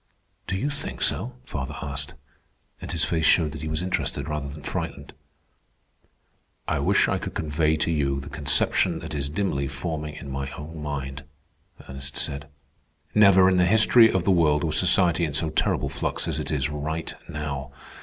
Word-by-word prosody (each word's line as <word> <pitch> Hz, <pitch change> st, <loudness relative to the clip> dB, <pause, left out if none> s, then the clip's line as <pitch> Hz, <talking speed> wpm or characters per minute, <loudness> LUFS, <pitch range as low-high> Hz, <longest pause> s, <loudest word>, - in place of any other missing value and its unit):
"Do 95 Hz, -, -1 dB
you 140 Hz, +10 st, -1 dB
think 140 Hz, -, -6 dB
so?" 125 Hz, +3 st, +1 dB
father 70 Hz, -, -5 dB
asked, 70 Hz, -1 st, -4 dB, 0.7 s
and -, -, -6 dB
his 80 Hz, -, 0 dB
face 80 Hz, +1 st, -1 dB
showed 80 Hz, -1 st, +4 dB
that 75 Hz, -, -8 dB
he 80 Hz, -, -4 dB
was 80 Hz, +2 st, -2 dB
interested 75 Hz, -6 st, -2 dB
rather 75 Hz, -2 st, -3 dB
than 75 Hz, +1 st, -10 dB
frightened. -, -, -5 dB, 1.5 s
"I -, -, 0 dB
wish -, -, +3 dB
I -, -, 0 dB
could -, -, -6 dB
convey 80 Hz, 0 st, +1 dB
to 80 Hz, -, 0 dB
you 70 Hz, -3 st, 0 dB
the 70 Hz, -, -9 dB
conception 75 Hz, -3 st, +2 dB
that -, -, -7 dB
is 70 Hz, -1 st, -2 dB
dimly 75 Hz, -5 st, -1 dB
forming 75 Hz, +2 st, -4 dB
in 70 Hz, -3 st, -8 dB
my 70 Hz, 0 st, -3 dB
own 75 Hz, +3 st, -8 dB
mind," 70 Hz, -1 st, -5 dB, 0.6 s
Ernest 65 Hz, 0 st, -7 dB
said. 70 Hz, 0 st, -1 dB, 0.7 s
"Never 100 Hz, -3 st, +6 dB
in 95 Hz, -1 st, +3 dB
the 90 Hz, -, +4 dB
history 110 Hz, +3 st, +6 dB
of 95 Hz, -, 0 dB
the 95 Hz, -, +2 dB
world 75 Hz, -4 st, +3 dB
was 80 Hz, -2 st, +1 dB
society 90 Hz, -2 st, +3 dB
in 75 Hz, -4 st, -1 dB
so 80 Hz, 0 st, +2 dB
terrific -, -, 0 dB
flux -, -, -2 dB
as -, -, -1 dB
it -, -, -4 dB
is 70 Hz, -3 st, 0 dB
right 80 Hz, +2 st, -4 dB, 0.2 s
now. 70 Hz, -2 st, -5 dB
75 Hz, 180 wpm, -25 LUFS, 70-85 Hz, 1.5 s, Never